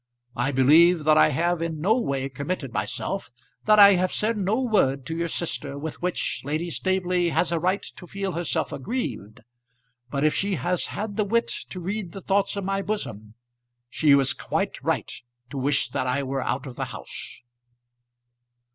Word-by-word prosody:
I 125 +4 0
believe 155 +6 +5
that 155 0 +5
I - - +6
have 170 +4 0
in 165 -2 -3
no 200 +8 +3
way 135 - -1
committed 140 0 -4
myself - - -3 0.4
that 215 0 +5
I 200 -1 +9
have 185 0 +1
said 225 +2 0
no 205 +3 0
word 140 - +1
to 160 - -4
your 170 0 -1
sister 160 -4 -3
with 155 +2 -6
which 180 0 -2
Lady 155 +5 -2
Staveley 180 -1 +1
has 170 +1 +1
a 170 - +1
right 185 +4 0
to 180 - -9
feel 195 +1 -3
herself 170 -1 -1
aggrieved; 130 - -4 0.7
but 140 +2 -1
if 155 - +3
she 200 -1 0
has 180 +1 -1
had 205 -1 -5
the 215 - +3
wit 230 +3 +1 0.2
to 185 - -6
read 190 0 -4
the 195 - -7
thoughts 200 +1 +1
of 200 - -3
my 195 +1 -1
bosom, 110 - -5 0.6
she 155 - +1
is 140 -1 +5
quite - - -3
right - - -1 0.4
to 140 - -4
wish 140 -1 +1
that 130 - -2
I 135 +3 0
were 135 0 -2
out 130 +3 -2
of 130 -3 -8
the - - -2
house." - - -8
170 Hz, 180 wpm, -25 LUFS, 140-195 Hz, 0.7 s, I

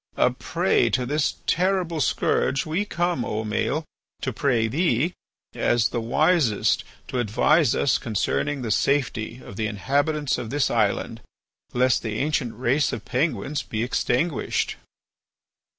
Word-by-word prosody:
A - - +4
prey - - +1
to 125 -1 0
this 145 +3 0
terrible 180 -3 +1
scourge, 135 0 +1
we 165 +6 -1
come, 175 - -1
O 110 -1 -2
Maël, 125 +8 -1 0.4
to 130 - -1
pray 120 -4 +1
thee, 155 +4 +1 0.4
as 120 -2 +2
the 120 - -2
wisest, 140 - +2 0.2
to 125 - -2
advise 125 +6 +3
us 135 - +2
concerning 115 - -1
the 115 - -2
safety 125 -2 0
of 100 - -10
the 110 - 0
inhabitants 140 +7 0
of 120 -3 -5
this 145 +2 +1
island 110 0 0 0.5
lest 125 0 +3
the 110 -2 -3
ancient 135 -4 -1
race 130 +4 +1
of 115 -4 -6
Penguins 145 +2 -1
be 110 0 -3
extinguished." 125 +4 0
130 Hz, 135 wpm, -24 LUFS, 115-150 Hz, 0.5 s, A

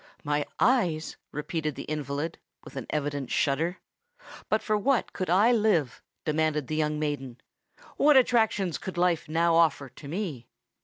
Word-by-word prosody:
"My 145 -1 0
eyes!" 175 -11 +2 0.2
repeated 150 0 -3
the - - -6
invalid, 150 +1 -4 0.2
with - - -12
an - - -5
evident 145 -3 -2
shudder. 160 +6 0 0.7
"But 215 - +1
for 215 - +1
what 245 +4 +1
could 185 - -3
I 200 +7 +5
live?" 210 - +2 0.2
demanded 155 -1 +1
the 155 - -3
young 150 -1 0
maiden: 145 -5 -3 0.6
"what 295 -1 +6
attractions 220 -8 +2
could 190 -2 -7
life 175 -3 +1
now 165 +1 +2
offer 160 -5 +3
to 145 - -12
me?" 155 - -4
160 Hz, 150 wpm, -27 LUFS, 145-190 Hz, 0.7 s, what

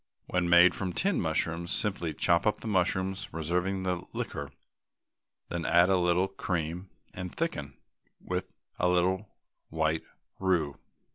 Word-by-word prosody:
When 90 -1 0
made 85 +1 +7
from 95 -2 -3
tinned 195 0 +1
mushrooms, 80 +2 -1
simply 95 -6 -1
chop 85 +6 +3
up 105 -1 +1
the - - -6
mushrooms, 95 0 0
reserving 90 +4 -1
the 90 -2 -1
liquor, 70 -1 -4 1.0
then 85 -1 -3
add 85 +3 +5
a - - +5
little 90 +1 +3
cream 90 -1 -3 0.2
and 90 -1 -5
thicken 75 - -3 0.4
with - - -4 0.3
a 90 - +3
little 95 +3 +1 0.4
white 80 0 0 0.4
roux. 85 -7 +1
90 Hz, 135 wpm, -29 LUFS, 85-95 Hz, 1.0 s, made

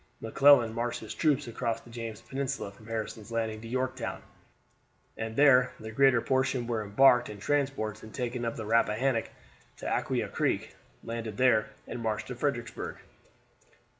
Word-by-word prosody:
McClellan 120 0 +5
marched 120 +1 -2
his 110 - -6
troops 150 -6 +1
across 115 -1 -2
the 120 - -15
James 115 -2 -6
Peninsula 135 -5 -3
from 110 +2 -17
Harrison's 110 -1 -5
Landing 110 -1 -2
to 115 - -8
Yorktown, 130 0 -3 0.9
and 110 0 -5
there 130 -2 +5
the 110 0 -7
greater 130 0 +4
portion 130 -1 +1
were 115 -2 -1
embarked 120 +4 +5
in 105 - -7
transports 110 -3 -1
and 110 - -11
taken 120 0 -3
up 115 0 -2
the 110 - -5
Rappahannock 115 +2 +2 0.5
to - - -9
Aquia - - 0
Creek, - - -1 0.3
landed 115 -2 -5
there, 125 -4 +4 0.2
and 120 - -6
marched 110 -2 -1
to 125 - -4
Fredericksburg. 120 -3 -3
115 Hz, 155 wpm, -29 LUFS, 110-130 Hz, 0.9 s, McClellan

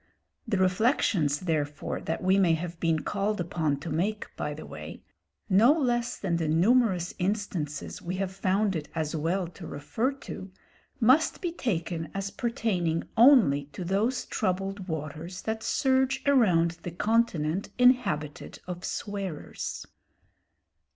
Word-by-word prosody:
The 215 -3 +1
reflections 185 - +2
therefore 155 -4 -2
that 160 - -3
we 190 +2 +4
may 170 -4 +4
have 170 +1 -6
been 165 -2 +1
called 205 +1 -1
upon 160 -4 -1
to 165 - -5
make 200 +7 -2
by - - -3
the - - -9
way, - - -9 0.4
no 215 +7 +6
less 240 -6 0
than 175 -4 -1
the 165 -2 -1
numerous 185 +2 +3
instances 180 -6 -2
we 180 +2 -4
have 190 0 -2
found 195 +1 +1
it 150 -2 -4
as 155 -1 -2
well 170 +5 0
to 175 -1 -10
refer 220 - -1
to, 195 -8 -9 0.5
must 260 +7 +4
be 350 -3 -2
taken 170 - -2
as 195 0 -3
pertaining 185 -9 -1
only 220 - +6
to 185 - -5
those 205 +8 0
troubled 195 0 -2
waters 160 +2 -5
that 220 0 -2
surge 265 +2 +1
around 175 -11 +3
the - - -5
continent 185 -3 0
inhabited 210 - +2
of 180 0 -6
swearers. 195 -6 -4
185 Hz, 135 wpm, -28 LUFS, 165-220 Hz, 0.5 s, no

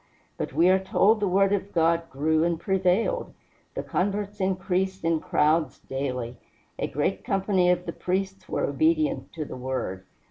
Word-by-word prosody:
But - - -4
we 165 +5 +3
are 190 +1 +5
told 195 +3 +3
the 205 - +1
word 195 +2 +3
of 200 0 -2
God 165 0 +2
grew 155 +4 +1
and 170 -1 0
prevailed, 190 - 0 0.4
the - - -3
converts 205 +2 -2
increased 190 -1 -1
in 165 -1 +2
crowds 155 -1 +1
daily, 125 -3 -4 0.4
"a - - 0
great 150 +7 -1
company 195 -4 +2
of 180 0 +1
the 170 - -4
priests 190 +1 -3
were - - -1
obedient" 315 -3 +1
to 155 -2 -4
the - - -8
word. 125 -8 -4
180 Hz, 165 wpm, -26 LUFS, 160-195 Hz, 0.4 s, are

